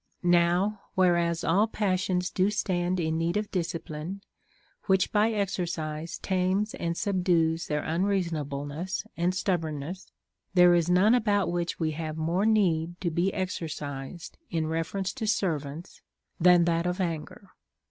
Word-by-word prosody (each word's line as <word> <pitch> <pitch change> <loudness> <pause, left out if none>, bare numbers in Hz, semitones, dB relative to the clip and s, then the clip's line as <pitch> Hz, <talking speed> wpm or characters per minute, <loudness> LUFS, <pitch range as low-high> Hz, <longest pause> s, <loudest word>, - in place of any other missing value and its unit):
11. 175 - +3
Now, 175 +4 +2
whereas 170 -2 +2
all 200 +7 +3
passions 185 -3 0
do 190 +2 +2
stand 185 -3 0
in 160 -1 0
need 170 +3 0
of 210 0 -3
dis 170 -3 -1
cipline, 165 +3 -6 0.7
which 190 -1 +3
by 210 +1 +3
exercise 170 -6 -3
tames 190 +4 0
and 170 -10 -3
subdues 175 -5 +1
their 150 -1 -2
un 165 +3 0
reasonableness 160 -1 -2
and 175 +2 0
stubbornness, 170 -1 -3 0.4
there 180 -1 +7
is 170 0 +2
none 185 +6 +5
about 205 -7 +2
which 175 0 -2
we 160 -2 0
have 155 0 -5
more 170 +6 +1
need 175 -6 +2
to 175 -3 -1
be 175 +4 +1
exercised 160 -4 -5
in 160 -2 -1
reference 165 +5 -2
to 225 -5 -4
servants 160 -5 -2 0.4
than 175 0 +6
that 170 0 +1
of 180 +2 -2
anger. 175 +2 -4
175 Hz, 145 wpm, -28 LUFS, 165-190 Hz, 0.7 s, there